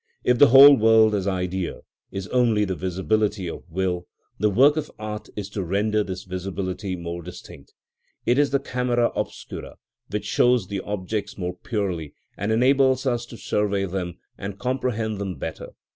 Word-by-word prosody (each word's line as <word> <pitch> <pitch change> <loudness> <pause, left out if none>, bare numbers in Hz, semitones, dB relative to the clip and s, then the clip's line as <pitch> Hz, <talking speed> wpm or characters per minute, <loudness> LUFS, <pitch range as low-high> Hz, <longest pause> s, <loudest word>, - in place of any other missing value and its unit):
If 125 -1 +2
the 145 - +9
whole 140 +3 +10
world 110 -1 +5
as 100 -2 -1
idea 90 -1 -2 0.3
is 95 -1 -5
only 115 -4 +3
the 95 - -2
visibility 95 +2 -1
of 85 - -8
will, 90 0 -2 0.3
the 105 +1 +3
work 135 +8 +5
of 155 -1 -3
art 105 0 -6
is 105 -2 -4
to 100 - -3
render 105 +4 +1
this 95 -1 -6
visibility 95 +1 -4
more 85 0 -5
distinct. 85 -5 -12 0.5
It 125 +3 +3
is 145 -1 +3
the 140 - +2
camera 125 -2 0
obscura - - -5 0.3
which 105 +1 -3
shows 120 -2 +2
the 100 -1 -2
objects 105 +1 -4
more 90 -1 -3
purely, 90 - -3 0.2
and 100 +3 -2
enables 130 +3 +3
us 120 -2 -1
to 115 - -10
survey 100 -1 0
them 90 -2 -4 0.2
and 100 0 -5
comprehend 115 -4 -2
them 95 -3 -3
better. 80 - -6
105 Hz, 165 wpm, -24 LUFS, 95-120 Hz, 0.5 s, whole